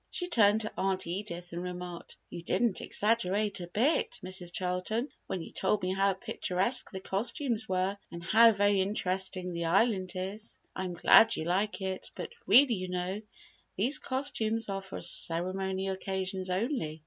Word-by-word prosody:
She 355 Hz, -, -3 dB
turned 220 Hz, -, +4 dB
to 220 Hz, -, -2 dB
Aunt 190 Hz, 0 st, 0 dB
Edith 175 Hz, -1 st, -5 dB
and 170 Hz, -, -4 dB
remarked, 180 Hz, -1 st, -7 dB
"You 170 Hz, -, -6 dB
didn't 215 Hz, +4 st, 0 dB
exaggerate 210 Hz, -2 st, 0 dB
a 175 Hz, -, -6 dB
bit, 240 Hz, -, +1 dB
Mrs. 185 Hz, -1 st, -3 dB
Charlton, 185 Hz, -, -1 dB, 0.2 s
when 180 Hz, -, -3 dB
you -, -, -10 dB
told 195 Hz, +1 st, 0 dB
me 185 Hz, +1 st, 0 dB
how 195 Hz, +1 st, +2 dB
picturesque 190 Hz, +4 st, 0 dB
the 190 Hz, -, -6 dB
costumes 225 Hz, +3 st, -1 dB
were 185 Hz, +1 st, 0 dB, 0.2 s
and 170 Hz, 0 st, -8 dB
how 225 Hz, +6 st, +6 dB
very 205 Hz, -1 st, +2 dB
interesting 190 Hz, -2 st, -1 dB
the 170 Hz, 0 st, -3 dB
Island 190 Hz, +1 st, +2 dB
is." 195 Hz, +4 st, -5 dB, 0.2 s
"I 190 Hz, -, -3 dB
am 180 Hz, -1 st, -5 dB
glad 225 Hz, +6 st, +6 dB
you -, -, -3 dB
like 195 Hz, +5 st, 0 dB
it, 190 Hz, 0 st, -4 dB
but -, -, -6 dB
really 245 Hz, +5 st, +7 dB
you 185 Hz, -3 st, -3 dB
know, 180 Hz, +3 st, -3 dB, 0.6 s
these 255 Hz, +10 st, +2 dB
costumes 230 Hz, -6 st, 0 dB
are 195 Hz, 0 st, -2 dB
for 195 Hz, 0 st, -8 dB
ceremonial 190 Hz, +3 st, 0 dB
occasions 190 Hz, 0 st, -3 dB
only. 185 Hz, -, -2 dB
190 Hz, 165 wpm, -30 LUFS, 180-215 Hz, 0.6 s, really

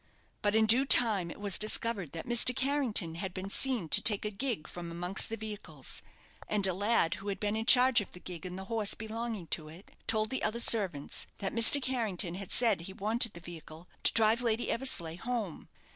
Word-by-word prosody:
But 205 Hz, -1 st, -1 dB
in 220 Hz, 0 st, +3 dB
due 245 Hz, +5 st, +4 dB
time 210 Hz, -9 st, +4 dB
it -, -, -11 dB
was 200 Hz, -3 st, -1 dB
discovered 215 Hz, -6 st, +1 dB
that 165 Hz, -, -7 dB
Mr. 240 Hz, +1 st, +4 dB
Carrington 260 Hz, -, -1 dB
had 190 Hz, -2 st, -6 dB
been 190 Hz, +1 st, -7 dB
seen 250 Hz, -9 st, 0 dB
to -, -, +10 dB
take 210 Hz, -1 st, +5 dB
a 210 Hz, -, -3 dB
gig 220 Hz, -, -4 dB
from 175 Hz, -1 st, -9 dB
amongst 175 Hz, +3 st, -1 dB
the 225 Hz, -, -5 dB
vehicles; 215 Hz, -1 st, -6 dB, 0.5 s
and 210 Hz, -2 st, 0 dB
a 190 Hz, -, 0 dB
lad, 205 Hz, -3 st, +1 dB
who 200 Hz, -, -10 dB
had 200 Hz, -, -4 dB
been 210 Hz, 0 st, -3 dB
in 225 Hz, +1 st, -5 dB
charge 250 Hz, -2 st, +6 dB
of 200 Hz, -, -11 dB
the 180 Hz, -, -13 dB
gig 180 Hz, -1 st, -9 dB
and 180 Hz, 0 st, -7 dB
the 190 Hz, -, -7 dB
horse 220 Hz, -1 st, 0 dB
belonging 225 Hz, -3 st, -6 dB
to 155 Hz, -2 st, -5 dB
it, 165 Hz, +6 st, -15 dB, 0.2 s
told 215 Hz, -1 st, 0 dB
the 260 Hz, -, -3 dB
other 215 Hz, +2 st, -2 dB
servants 195 Hz, -12 st, +1 dB
that 195 Hz, -, -5 dB
Mr. 230 Hz, +5 st, +5 dB
Carrington 225 Hz, -10 st, -2 dB
had 190 Hz, +1 st, -9 dB
said 225 Hz, -7 st, +3 dB
he 190 Hz, +3 st, -10 dB
wanted 220 Hz, +3 st, 0 dB
the 170 Hz, -, -11 dB
vehicle 165 Hz, -1 st, -12 dB, 0.2 s
to -, -, +5 dB
drive 225 Hz, +1 st, +3 dB
Lady 230 Hz, -1 st, -1 dB
Eversleigh 175 Hz, -10 st, -1 dB
home. 225 Hz, -5 st, -6 dB
210 Hz, 210 wpm, -29 LUFS, 180-230 Hz, 0.5 s, to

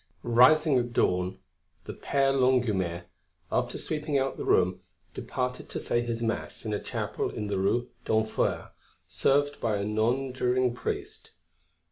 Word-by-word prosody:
XIV 120 Hz, -, -3 dB
Rising 145 Hz, +3 st, +6 dB
at 120 Hz, -1 st, -3 dB
dawn, 90 Hz, -4 st, +1 dB, 0.5 s
the -, -, -7 dB
Père 135 Hz, -1 st, +1 dB
Longuemare, 110 Hz, -10 st, +1 dB, 0.5 s
after -, -, 0 dB
sweeping 150 Hz, -2 st, -2 dB
out 135 Hz, 0 st, 0 dB
the -, -, -5 dB
room, 90 Hz, 0 st, +2 dB, 0.3 s
departed 125 Hz, -1 st, -4 dB
to -, -, -4 dB
say 120 Hz, -, 0 dB
his 115 Hz, -1 st, -3 dB
Mass 115 Hz, +1 st, -3 dB
in 105 Hz, -, -2 dB
a 105 Hz, -, -1 dB
chapel -, -, -3 dB
in 105 Hz, -, -5 dB
the 100 Hz, -2 st, -1 dB
Rue 120 Hz, +6 st, +1 dB, 0.2 s
d'Enfer 110 Hz, 0 st, 0 dB, 0.4 s
served 145 Hz, +1 st, +1 dB
by 110 Hz, -3 st, +1 dB
a 100 Hz, -, -2 dB
nonjuring 125 Hz, +3 st, +1 dB
priest. 125 Hz, -, -5 dB
120 Hz, 145 wpm, -28 LUFS, 105-135 Hz, 0.5 s, Rising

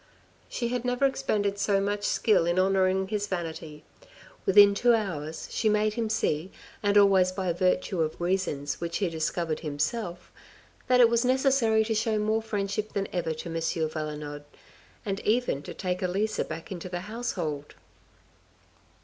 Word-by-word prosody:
She 235 Hz, -1 st, -2 dB
had 245 Hz, -1 st, -2 dB
never 250 Hz, +2 st, +1 dB
expended 210 Hz, -7 st, 0 dB
so 200 Hz, -1 st, +2 dB
much 205 Hz, +1 st, -1 dB
skill 210 Hz, -6 st, +2 dB
in 175 Hz, +1 st, +1 dB
honoring 190 Hz, 0 st, +2 dB
his 205 Hz, -1 st, -1 dB
vanity. 160 Hz, -4 st, -5 dB, 0.6 s
Within 200 Hz, +1 st, +7 dB
two 240 Hz, +3 st, +4 dB
hours 160 Hz, -7 st, -4 dB
she 220 Hz, -, +1 dB
made 210 Hz, 0 st, +2 dB
him 225 Hz, -1 st, -2 dB
see, 180 Hz, -4 st, -1 dB, 0.3 s
and 205 Hz, 0 st, +2 dB
always 195 Hz, -2 st, +5 dB
by 185 Hz, -2 st, -2 dB
virtue 185 Hz, +1 st, 0 dB
of 155 Hz, -1 st, -2 dB
reasons 175 Hz, -6 st, -1 dB
which 170 Hz, -1 st, -2 dB
he 195 Hz, -4 st, 0 dB
discovered 160 Hz, 0 st, -2 dB
himself, 170 Hz, +5 st, -3 dB, 0.6 s
that 250 Hz, 0 st, +5 dB
it 240 Hz, -, +8 dB
was 235 Hz, +1 st, +2 dB
necessary 255 Hz, -4 st, +3 dB
to 225 Hz, -, -1 dB
show 220 Hz, 0 st, 0 dB
more 215 Hz, +1 st, +1 dB
friendship 210 Hz, -1 st, -3 dB
than 200 Hz, -1 st, -2 dB
ever 175 Hz, -2 st, -1 dB
to 170 Hz, -, -7 dB
M. 165 Hz, 0 st, -3 dB, 0.3 s
Valenod, 150 Hz, -2 st, -5 dB, 0.6 s
and 195 Hz, -1 st, -2 dB
even 225 Hz, -, 0 dB
to -, -, -8 dB
take 180 Hz, -1 st, -3 dB
Elisa 195 Hz, +4 st, -1 dB
back 165 Hz, -, -8 dB
into 185 Hz, 0 st, -6 dB
the 175 Hz, -1 st, -4 dB
household. 180 Hz, -9 st, -4 dB
195 Hz, 160 wpm, -27 LUFS, 170-215 Hz, 0.6 s, it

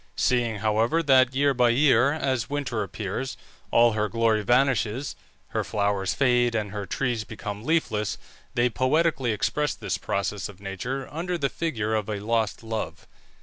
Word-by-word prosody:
Seeing, 120 Hz, -4 st, +1 dB
however, 115 Hz, +10 st, +2 dB
that 130 Hz, -3 st, +4 dB
year 140 Hz, +1 st, +3 dB
by 125 Hz, -1 st, +3 dB
year, 130 Hz, 0 st, +4 dB
as 130 Hz, -7 st, -1 dB
winter 140 Hz, -6 st, -2 dB
appears, 105 Hz, +5 st, -4 dB, 0.3 s
all 120 Hz, 0 st, +5 dB
her 105 Hz, -1 st, -1 dB
glory 115 Hz, -2 st, +2 dB
vanishes, 125 Hz, +1 st, +1 dB, 0.3 s
her -, -, -1 dB
flowers 100 Hz, -3 st, 0 dB
fade, 125 Hz, -3 st, +3 dB
and 105 Hz, -2 st, -1 dB
her 100 Hz, -2 st, -5 dB
trees 120 Hz, -5 st, -1 dB
become 105 Hz, -1 st, -7 dB
leafless, 115 Hz, -9 st, 0 dB, 0.4 s
they 120 Hz, +1 st, +3 dB
poetically 130 Hz, +1 st, +1 dB
expressed 145 Hz, +7 st, -1 dB
this 95 Hz, 0 st, -2 dB
process 100 Hz, 0 st, -2 dB
of 100 Hz, -2 st, -13 dB
nature 125 Hz, +8 st, -4 dB
under 175 Hz, +4 st, -2 dB
the 140 Hz, -4 st, 0 dB
figure 115 Hz, -10 st, -2 dB
of 110 Hz, -1 st, -1 dB
a 105 Hz, -1 st, -2 dB
lost 110 Hz, +1 st, -1 dB
love. 110 Hz, -1 st, -4 dB
115 Hz, 155 wpm, -26 LUFS, 105-135 Hz, 0.4 s, all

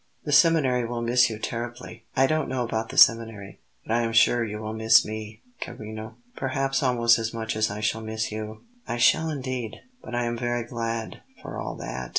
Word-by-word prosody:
"The 150 Hz, -, -2 dB
seminary 145 Hz, -6 st, +4 dB
will 120 Hz, 0 st, -3 dB
miss 120 Hz, +1 st, +4 dB
you 110 Hz, -, -5 dB
terribly." 120 Hz, +2 st, -6 dB
"I 135 Hz, -, +5 dB
don't 155 Hz, +2 st, 0 dB
know 130 Hz, -1 st, -1 dB
about 110 Hz, -1 st, -3 dB
the -, -, -8 dB
seminary, 115 Hz, -5 st, +4 dB, 0.3 s
but 110 Hz, -, -2 dB
I 120 Hz, -, +3 dB
am 115 Hz, -1 st, -1 dB
sure 120 Hz, +1 st, +4 dB
you 105 Hz, -1 st, -4 dB
will 110 Hz, 0 st, -5 dB
miss 110 Hz, 0 st, +5 dB
me, 110 Hz, 0 st, -7 dB, 0.2 s
carino; 110 Hz, -2 st, -7 dB, 0.2 s
perhaps 135 Hz, 0 st, -1 dB
almost 120 Hz, -3 st, +3 dB
as 115 Hz, +1 st, -3 dB
much 110 Hz, -1 st, -3 dB
as 110 Hz, 0 st, +1 dB
I 105 Hz, +1 st, -5 dB
shall 110 Hz, +1 st, 0 dB
miss 110 Hz, 0 st, -3 dB
you." 110 Hz, 0 st, -6 dB, 0.2 s
"I -, -, -2 dB
shall 160 Hz, +6 st, +4 dB
indeed; 130 Hz, -6 st, -4 dB, 0.3 s
but -, -, -6 dB
I 120 Hz, -, 0 dB
am 120 Hz, 0 st, -3 dB
very 120 Hz, -1 st, -1 dB
glad, 115 Hz, -1 st, -4 dB, 0.2 s
for -, -, -6 dB
all -, -, -4 dB
that." 65 Hz, +1 st, -6 dB
115 Hz, 200 wpm, -25 LUFS, 110-125 Hz, 0.3 s, I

